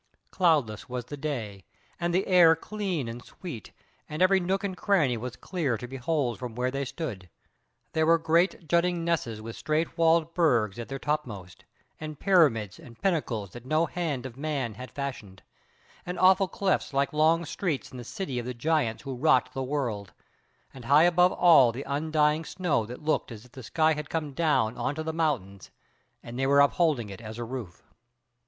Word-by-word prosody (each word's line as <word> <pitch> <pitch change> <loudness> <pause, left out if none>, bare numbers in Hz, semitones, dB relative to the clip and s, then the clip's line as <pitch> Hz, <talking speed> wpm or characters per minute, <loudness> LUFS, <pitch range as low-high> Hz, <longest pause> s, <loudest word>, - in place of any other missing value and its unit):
Cloudless 145 - +1
was 125 -1 -4
the 145 - -7
day, 120 -10 -5 0.4
and 175 0 0
the 185 +3 +1
air 175 -3 +6
clean 185 - -3
and 120 +1 -7
sweet, 160 - -9 0.4
and 150 - -5
every 190 +1 +5
nook 190 +3 -1
and 195 -2 -3
cranny 175 - +2
was 125 +2 -6
clear 145 -7 -2
to 125 - -7
behold 135 -1 -2
from 125 -3 -6
where 125 +1 -1
they 135 +1 -2
stood: 115 - -6 0.6
there 160 0 +2
were 165 0 +6
great 165 +1 +1
jutting 170 +1 +1
nesses 120 -11 -1
with 115 0 -7
straight 160 +2 -2
walled 165 0 +3
burgs 120 - +2
at 115 - -5
their 135 - -4
top 150 +1 -1
most, 95 -5 -10 0.3
and 155 -2 -7
pyramids 140 - +3
and 115 -1 -14
pinnacles 120 - -1
that 120 - -10
no 155 +5 +1
hand 155 -8 -3
of 125 -3 -7
man 140 -5 -3
had 125 +5 -9
fashioned, 115 -9 -6 0.6
and 180 +1 -5
awful 190 +1 +5
clefts 190 -4 -1
like 140 +1 +1
long 160 +2 +3
streets 155 -3 -3
in 130 - -9
the - - -7
city 130 - -4
of 120 - -5
the 125 - -4
giants 130 -3 0
who 135 -2 -5
wrought 130 -1 +2
the 135 - -3
world, 125 -8 -3 0.6
and 130 -3 -11
high 145 +5 +6
above 180 +1 +4
all 140 -9 +6
the 130 +4 -6
undying 150 +1 +1
snow 165 - -1
that 125 +5 -9
looked 155 -4 0
as 115 0 -10
if 125 - -20
the 130 - -10
sky 160 +6 +2
had 150 0 -6
come 155 -3 -3
down 140 -8 +1
on 140 - -1
to 160 - -4
the 160 0 -3
mountains 120 - -2 0.5
and 120 +2 -7
they 135 - +1
were 140 +1 +5
upholding 140 - +2
it 100 - -9
as 110 0 -8
a 120 - -4
roof. 115 -7 -7
145 Hz, 190 wpm, -27 LUFS, 120-165 Hz, 0.6 s, air